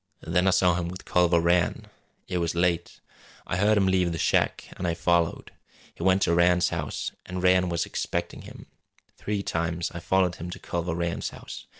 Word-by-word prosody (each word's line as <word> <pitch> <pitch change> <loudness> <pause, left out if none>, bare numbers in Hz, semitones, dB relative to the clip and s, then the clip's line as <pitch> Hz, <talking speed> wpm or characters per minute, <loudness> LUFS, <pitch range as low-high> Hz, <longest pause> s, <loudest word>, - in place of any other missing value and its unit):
Then 90 +3 +1
I - - +6
saw 90 -1 +4
him 85 0 -2
with 95 +1 -9
Culver 90 -1 +3
Rann. 85 0 +1 0.4
It 90 -1 -2
was 85 -1 -1
late. 85 0 0 0.5
I 85 - -2
heard 105 +3 +3
'im 100 - +3
leave 95 -2 +2
the 85 - -3
shack, - - +1
an' 90 - -3
I 85 - 0
followed. 85 -1 0 0.4
He - - -12
went 95 +2 +3
to 85 - +2
Rann's 90 +1 +4
house - - -3 0.2
an' 90 0 -4
Rann 90 0 +3
was 85 -1 -1
expecting - - -3
him. - - -12 0.5
Three 105 -1 -3
times 85 0 -2
I 85 - -5
followed 90 0 +1
him 85 - -6
to 90 - -6
Culver 85 -1 -3
Rann's 85 0 -2
house. - - -10
90 Hz, 195 wpm, -26 LUFS, 85-90 Hz, 0.5 s, I